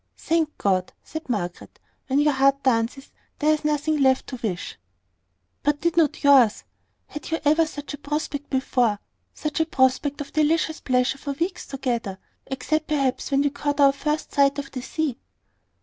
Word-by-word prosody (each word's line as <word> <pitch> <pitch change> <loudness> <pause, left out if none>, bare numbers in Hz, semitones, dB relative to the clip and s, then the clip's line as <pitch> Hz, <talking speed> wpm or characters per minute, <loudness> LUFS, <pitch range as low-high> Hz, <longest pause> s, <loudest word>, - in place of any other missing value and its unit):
"Thank 320 -2 0
God!" 185 -2 0
said 315 -2 -8
Margaret. 180 -7 -4 0.3
"When 270 - +1
your 295 0 +4
heart 275 +1 +3
dances, 255 +2 0 0.3
there 305 +1 +3
is 305 - -2
nothing 300 0 0
left 265 -1 +3
to 255 - -6
wish." 185 -6 -4 0.8
"But 290 0 +1
did 340 0 0
not 325 -4 +2
yours? 265 -7 +5 0.4
Had 300 - -8
you 325 - 0
ever 310 +2 +4
such 290 -1 -7
a 290 - -7
prospect 290 -1 -3
before, 250 -5 +1 0.4
such 305 0 -3
a 320 - +3
prospect 270 +1 +1
of 280 -1 -7
delicious 310 +1 +1
pleasure 255 +1 +1
for 280 0 -4
weeks 345 +6 -3
together, 240 -8 -3 0.3
except 310 +4 -1
perhaps 275 -4 0
when 275 -1 +2
we 285 -1 +1
caught 290 0 -2
our 275 -1 +6
first 300 +2 -2
sight 280 0 +3
of 280 -1 -5
the 255 - -5
sea?" 280 -1 -2
280 Hz, 170 wpm, -24 LUFS, 260-300 Hz, 0.8 s, our